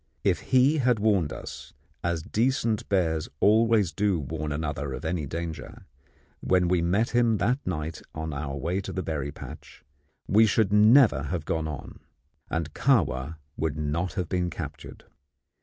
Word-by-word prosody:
If -, -, +2 dB
he 130 Hz, +4 st, +4 dB
had 125 Hz, -3 st, +3 dB
warned 100 Hz, -8 st, +2 dB
us, -, -, -9 dB, 0.3 s
as 85 Hz, -2 st, -1 dB
decent 115 Hz, 0 st, 0 dB
bears 80 Hz, -5 st, +1 dB
always 110 Hz, -3 st, +4 dB
do 100 Hz, -3 st, +1 dB
warn 80 Hz, +2 st, -5 dB
one -, -, -4 dB
another 75 Hz, -2 st, -3 dB
of -, -, -6 dB
any 80 Hz, -3 st, -2 dB
danger, 80 Hz, +2 st, -6 dB, 0.5 s
when 90 Hz, -1 st, +2 dB
we 90 Hz, -1 st, +2 dB
met 100 Hz, +8 st, +1 dB
him 120 Hz, -2 st, +3 dB
that 125 Hz, +9 st, +1 dB
night 80 Hz, -2 st, -3 dB
on 80 Hz, -1 st, -4 dB
our 70 Hz, 0 st, -4 dB
way 90 Hz, +7 st, -1 dB
to -, -, -6 dB
the 95 Hz, -, -3 dB
berry 75 Hz, -3 st, -3 dB
patch, -, -, -11 dB, 0.4 s
we 110 Hz, +3 st, +5 dB
should 105 Hz, -1 st, +2 dB
never 105 Hz, -, +6 dB
have 85 Hz, 0 st, -3 dB
gone 80 Hz, -1 st, -1 dB
on, 70 Hz, -5 st, -7 dB, 0.5 s
and 80 Hz, -2 st, -3 dB
Kahwa 80 Hz, -, +1 dB, 0.2 s
would 80 Hz, -2 st, -1 dB
not 80 Hz, +4 st, -2 dB
have 90 Hz, -3 st, -2 dB
been 90 Hz, 0 st, -1 dB
captured. 80 Hz, -, -8 dB
85 Hz, 160 wpm, -27 LUFS, 80-105 Hz, 0.5 s, never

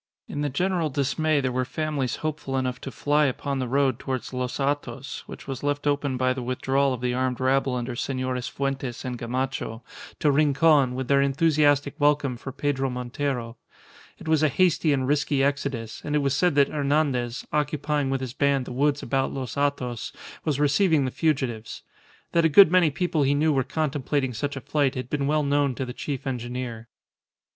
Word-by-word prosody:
In 145 Hz, -, -4 dB
the 145 Hz, -, 0 dB
general 175 Hz, +3 st, 0 dB
dismay 145 Hz, +2 st, +1 dB
there 130 Hz, -1 st, -1 dB
were 130 Hz, +1 st, 0 dB
families 140 Hz, -1 st, -2 dB
hopeful 150 Hz, -3 st, -2 dB
enough 130 Hz, -1 st, -2 dB
to -, -, -5 dB
fly 145 Hz, +5 st, +2 dB
upon 140 Hz, +1 st, -2 dB
the 130 Hz, -, -2 dB
road 135 Hz, -1 st, +1 dB
towards 130 Hz, -1 st, -4 dB
Los 125 Hz, 0 st, -2 dB
Hatos, 140 Hz, -1 st, -2 dB
which -, -, -10 dB
was 135 Hz, -2 st, -5 dB
left 145 Hz, 0 st, -1 dB
open 145 Hz, -2 st, 0 dB
by 130 Hz, 0 st, +2 dB
the 130 Hz, -, -5 dB
withdrawal 135 Hz, +2 st, +1 dB
of 125 Hz, -2 st, -4 dB
the 125 Hz, -1 st, 0 dB
armed 130 Hz, 0 st, -1 dB
rabble 130 Hz, 0 st, +2 dB
under 120 Hz, 0 st, -3 dB
Senores 130 Hz, -1 st, -2 dB
Fuentes 135 Hz, -3 st, -3 dB
and 125 Hz, -2 st, -4 dB
Gamacho, 125 Hz, -1 st, -3 dB, 0.3 s
to 150 Hz, -, +3 dB
Rincon, 140 Hz, -2 st, +4 dB
with 130 Hz, -1 st, -3 dB
their 140 Hz, +1 st, +4 dB
enthusiastic 145 Hz, 0 st, +2 dB
welcome 145 Hz, -3 st, +2 dB
for 135 Hz, +3 st, -7 dB
Pedro 135 Hz, 0 st, -1 dB
Montero. 125 Hz, -1 st, -3 dB, 0.6 s
It -, -, -11 dB
was 160 Hz, -1 st, +3 dB
a 155 Hz, -, +4 dB
hasty 170 Hz, 0 st, +2 dB
and 130 Hz, -2 st, +1 dB
risky 145 Hz, -1 st, +1 dB
exodus, 135 Hz, -5 st, -2 dB
and 150 Hz, -, -2 dB
it 150 Hz, -, +2 dB
was 140 Hz, -1 st, +1 dB
said 180 Hz, -2 st, +2 dB
that 140 Hz, -1 st, +4 dB
Hernandez, 140 Hz, -4 st, 0 dB
occupying 150 Hz, -1 st, 0 dB
with 135 Hz, -1 st, -1 dB
his 130 Hz, -2 st, -5 dB
band 140 Hz, -2 st, +1 dB
the -, -, -7 dB
woods 145 Hz, +2 st, +1 dB
about 135 Hz, -1 st, 0 dB
Los 130 Hz, -4 st, -5 dB
Hatos, 140 Hz, -5 st, -1 dB, 0.3 s
was 150 Hz, -3 st, -1 dB
receiving 150 Hz, 0 st, +3 dB
the 130 Hz, -, -2 dB
fugitives. 130 Hz, -9 st, -1 dB, 0.5 s
That 170 Hz, -, +3 dB
a 160 Hz, -, +4 dB
good 180 Hz, +2 st, +8 dB
many 180 Hz, -3 st, +5 dB
people 165 Hz, +1 st, -1 dB
he 140 Hz, +1 st, +3 dB
knew 155 Hz, +1 st, +2 dB
were 135 Hz, -2 st, +2 dB
contemplating 145 Hz, -3 st, -1 dB
such 140 Hz, +6 st, -3 dB
a 135 Hz, -, -5 dB
flight 140 Hz, +1 st, 0 dB
had 130 Hz, -1 st, -5 dB
been 140 Hz, -2 st, 0 dB
well 150 Hz, +1 st, +2 dB
known 140 Hz, -2 st, +1 dB
to 130 Hz, -, -3 dB
the 125 Hz, -, -6 dB
chief 140 Hz, 0 st, -5 dB
engineer. 120 Hz, -2 st, -4 dB
140 Hz, 190 wpm, -25 LUFS, 130-145 Hz, 0.6 s, good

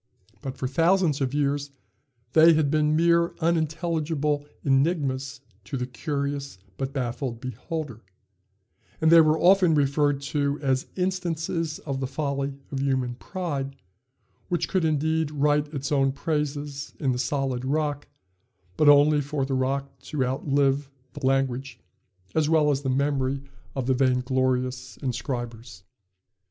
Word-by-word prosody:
But 135 Hz, -1 st, -6 dB
for 130 Hz, -, -2 dB
thousands 165 Hz, 0 st, +2 dB
of 130 Hz, -2 st, 0 dB
years 145 Hz, 0 st, 0 dB, 0.6 s
they 165 Hz, +1 st, +7 dB
had 155 Hz, -3 st, +2 dB
been 155 Hz, 0 st, +2 dB
mere 170 Hz, +1 st, +3 dB
unintelligible 160 Hz, -2 st, 0 dB, 0.2 s
enigmas 135 Hz, -2 st, +1 dB, 0.2 s
to 135 Hz, -, -4 dB
the 125 Hz, -, -2 dB
curious 140 Hz, -, -3 dB, 0.2 s
but 135 Hz, 0 st, -3 dB
baffled 125 Hz, -2 st, -3 dB
beholder; 125 Hz, +1 st, -5 dB, 1.0 s
and 160 Hz, 0 st, +3 dB
they 165 Hz, -1 st, +9 dB
were 155 Hz, 0 st, +3 dB
often 180 Hz, -2 st, +5 dB
referred 145 Hz, 0 st, +2 dB
to 145 Hz, -1 st, 0 dB
as 130 Hz, -2 st, 0 dB
instances 170 Hz, -3 st, -2 dB
of 135 Hz, -3 st, -4 dB
the 135 Hz, -, -2 dB
folly 140 Hz, 0 st, -2 dB
of 135 Hz, -, -2 dB
human 130 Hz, -3 st, 0 dB
pride, 140 Hz, -2 st, -4 dB, 0.7 s
which 175 Hz, -2 st, 0 dB
could 185 Hz, -4 st, +1 dB
indeed 160 Hz, 0 st, +1 dB
write 150 Hz, 0 st, +1 dB
its 140 Hz, 0 st, -4 dB
own 135 Hz, -2 st, +2 dB
praises 145 Hz, -1 st, -3 dB
in 135 Hz, -4 st, +1 dB
the 125 Hz, -, -2 dB
solid 130 Hz, 0 st, -1 dB
rock, 145 Hz, +1 st, -1 dB, 0.7 s
but 150 Hz, -, +5 dB
only 145 Hz, +1 st, +6 dB
for 145 Hz, -1 st, -2 dB
the 135 Hz, -, -3 dB
rock 135 Hz, +1 st, -1 dB
to 135 Hz, 0 st, -2 dB
outlive 135 Hz, +1 st, +1 dB, 0.2 s
the 145 Hz, -, -10 dB
language 135 Hz, -2 st, 0 dB, 0.5 s
as 155 Hz, -1 st, +2 dB
well 155 Hz, -2 st, +4 dB
as 140 Hz, -1 st, 0 dB
the 135 Hz, -, -2 dB
memory 135 Hz, 0 st, 0 dB, 0.3 s
of 135 Hz, -2 st, -2 dB
the 130 Hz, -, +2 dB
vainglorious 130 Hz, 0 st, 0 dB
inscribers. 120 Hz, -6 st, -4 dB
140 Hz, 135 wpm, -26 LUFS, 135-155 Hz, 1.0 s, they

